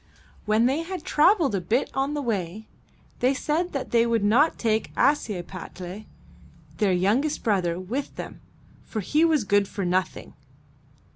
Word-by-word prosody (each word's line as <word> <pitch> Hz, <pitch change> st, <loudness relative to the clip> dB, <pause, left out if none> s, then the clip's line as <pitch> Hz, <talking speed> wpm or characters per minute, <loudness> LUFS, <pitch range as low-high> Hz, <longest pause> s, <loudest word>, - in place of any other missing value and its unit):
When 215 Hz, +2 st, +3 dB
they 270 Hz, +6 st, +1 dB
had 360 Hz, -1 st, -6 dB
traveled 320 Hz, -, +3 dB
a 195 Hz, -, 0 dB
bit 235 Hz, +8 st, 0 dB
on 270 Hz, +2 st, -1 dB
the 290 Hz, -, -2 dB
way, 210 Hz, -2 st, -3 dB, 0.5 s
they 255 Hz, +2 st, +2 dB
said 320 Hz, +6 st, -1 dB
that 275 Hz, -, -4 dB
they 235 Hz, 0 st, +3 dB
would 230 Hz, -3 st, +1 dB
not 245 Hz, +10 st, +3 dB
take 220 Hz, -1 st, 0 dB
Ashiepattle, 190 Hz, -, -2 dB, 0.7 s
their 205 Hz, -3 st, +2 dB
young 195 Hz, +9 st, +2 dB
est 310 Hz, -, -3 dB
brother, 180 Hz, -5 st, 0 dB
with 240 Hz, +10 st, -4 dB
them, -, -, -8 dB, 0.4 s
for 215 Hz, -, -4 dB
he 300 Hz, -, +2 dB
was 315 Hz, -6 st, +3 dB
good 205 Hz, 0 st, +2 dB
for 195 Hz, -1 st, -4 dB
nothing. 180 Hz, +1 st, -2 dB
225 Hz, 155 wpm, -25 LUFS, 195-285 Hz, 0.7 s, When